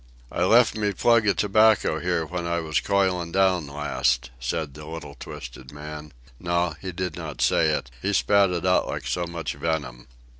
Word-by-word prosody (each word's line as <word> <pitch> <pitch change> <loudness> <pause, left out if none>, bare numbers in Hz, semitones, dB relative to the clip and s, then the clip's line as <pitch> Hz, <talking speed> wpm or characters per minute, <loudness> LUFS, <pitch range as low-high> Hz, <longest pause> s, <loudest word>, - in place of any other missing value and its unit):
"I 90 - 0
left 115 +3 +5
me 105 -2 0
plug 115 +2 +3
of 100 - +3
tobacco 110 +1 +3
here 85 -1 0
when 85 +2 -4
I 85 0 0
was 80 -2 0
coiling 95 -4 0
down 95 -4 +2
last," 60 -4 -1
said 70 +4 -3
the 75 +1 -10
little 80 -3 -7
twisted 65 -1 -9
man—no; 75 +3 -4
he 95 - -4
did 90 +1 -4
not 80 -4 -7
say - - +3
it. - - -1
He 100 - 0
spat 100 0 +4
it 90 -1 -2
out 90 0 +3
like - - -4
so 85 -1 -1
much 85 -1 -4
venom. 70 -6 -3
85 Hz, 180 wpm, -25 LUFS, 75-95 Hz, -, left